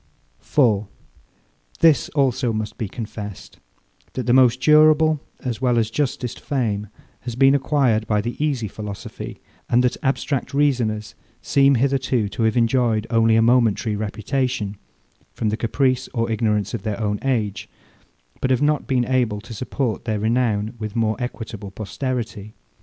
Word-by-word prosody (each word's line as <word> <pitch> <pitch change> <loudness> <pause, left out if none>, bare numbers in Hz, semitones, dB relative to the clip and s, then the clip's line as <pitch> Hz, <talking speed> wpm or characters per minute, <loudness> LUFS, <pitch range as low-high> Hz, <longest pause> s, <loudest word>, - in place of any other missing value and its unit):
4. 110 -8 +2 0.9
This 160 -3 +4
also 130 -3 +2
must 110 -1 -4
be 110 - -2
confessed, 105 -2 -8 0.5
that 130 - -3
the 120 - +3
most 130 -1 +5
durable, 155 +1 +5 0.2
as 125 -1 -4
well 125 -2 +2
as 110 -1 +1
justest 125 -3 -2
fame, 110 -7 -2 0.3
has 120 -1 -6
been 135 +2 +5
acquired 135 -6 +1
by 105 -1 +2
the 120 +3 -3
easy 135 -7 0
philosophy, 100 0 -7 0.3
and 120 +1 +4
that 125 0 +1
abstract 135 0 -1
reasoners 115 -7 +1 0.3
seem 140 0 +4
hitherto 130 -3 +1
to 115 - -5
have 110 +1 +2
enjoyed 115 -2 +2
only 115 -1 +4
a 115 - +4
momentary 115 -2 +2
reputation, 110 +1 -2 0.6
from 110 - -1
the 105 - 0
caprice 130 +3 0
or 115 -1 0
ignorance 105 -2 0
of 115 - -3
their 105 +1 -3
own 105 -1 -1
age, 110 -7 -1 0.7
but 130 - 0
have 130 - +3
not 150 0 +1
been 125 -2 +1
able 120 -5 0
to 115 +3 -10
support 125 +1 -3
their 110 -2 -1
renown 110 -1 0
with 110 -1 -5
more 110 -2 +1
equitable 115 -4 -6
posterity. 110 0 -5
115 Hz, 150 wpm, -22 LUFS, 110-130 Hz, 0.9 s, most